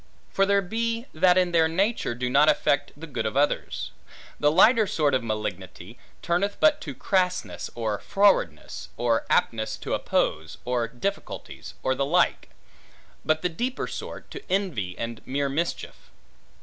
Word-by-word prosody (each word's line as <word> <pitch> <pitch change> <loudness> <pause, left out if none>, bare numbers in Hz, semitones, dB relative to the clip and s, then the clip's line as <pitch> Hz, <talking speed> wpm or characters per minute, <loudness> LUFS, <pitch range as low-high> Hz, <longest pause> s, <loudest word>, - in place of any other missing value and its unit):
For 195 0 +2
there 200 0 +3
be, 230 +4 -2
that 180 +3 +4
in 180 -1 +3
their 165 -1 +4
nature 190 - 0
do 125 +1 -2
not 145 +5 +5
affect 145 0 +2
the 165 - -7
good 130 -8 -3
of 110 - -3
others. 145 +1 0 0.5
The 150 0 +4
lighter 220 +6 +5
sort 150 -6 +1
of 130 -2 +1
malignity, 105 -1 -5 0.2
turneth 180 +4 0
but 300 -1 +4
to - - -5
a - - -19
crassness, 185 -2 -1
or 110 -3 -2
frowardness, 200 0 +1
or 115 -1 +1
aptness 110 -1 +1
to - - -3
oppose, 80 0 -1
or 125 -2 0
difficulties, 125 - -5
or 130 - +2
the 140 - -1
like; 175 +3 +2 0.7
but 155 +1 +1
the 180 - +2
deeper 245 +10 -3
sort, - - -8
to 390 - -7
envy 155 - -1
and 115 0 -5
mere 140 +1 0
mischief. 165 +5 -4
155 Hz, 160 wpm, -26 LUFS, 120-195 Hz, 0.7 s, not